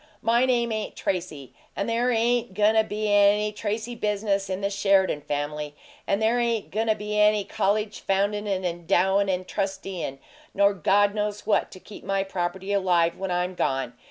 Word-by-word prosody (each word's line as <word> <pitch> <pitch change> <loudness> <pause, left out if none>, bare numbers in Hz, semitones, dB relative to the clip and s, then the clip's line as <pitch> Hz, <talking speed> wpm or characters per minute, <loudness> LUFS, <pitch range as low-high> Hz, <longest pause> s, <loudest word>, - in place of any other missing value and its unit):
MY 235 +3 +3
name 240 -2 +1
ain't 215 -1 -3
Tracy, 165 -8 -4 0.2
and 200 - -2
there 235 +2 +1
ain't 235 -3 +1
goin' 210 +1 +4
to 220 0 +4
be 215 0 -3
any 205 +1 +4
Tracy 215 +3 -4
business 205 -3 -1
in 190 +1 -3
the 200 0 -1
Sheridan 195 -6 +2
family. 145 +1 -4 0.3
And 200 - +1
there 225 +2 +2
ain't 235 -3 -1
goin' 220 +3 -1
to 220 - +3
be 210 0 -3
any 210 0 +4
college 210 +2 -1
foundin' 205 +2 0
and 190 -2 -1
endowin' 180 +3 +1
and 185 0 -2
trusteein', 195 -7 -4 0.4
nor 200 0 +4
God 200 +3 +2
knows 210 -1 -3
what 215 - +1
to 185 - -11
keep 210 - -12
my 195 0 0
property 190 +1 -3
alive 175 -4 +2
when 195 0 -4
I'm 180 +1 -1
gone! 135 -7 -1
200 Hz, 180 wpm, -25 LUFS, 185-215 Hz, 0.4 s, goin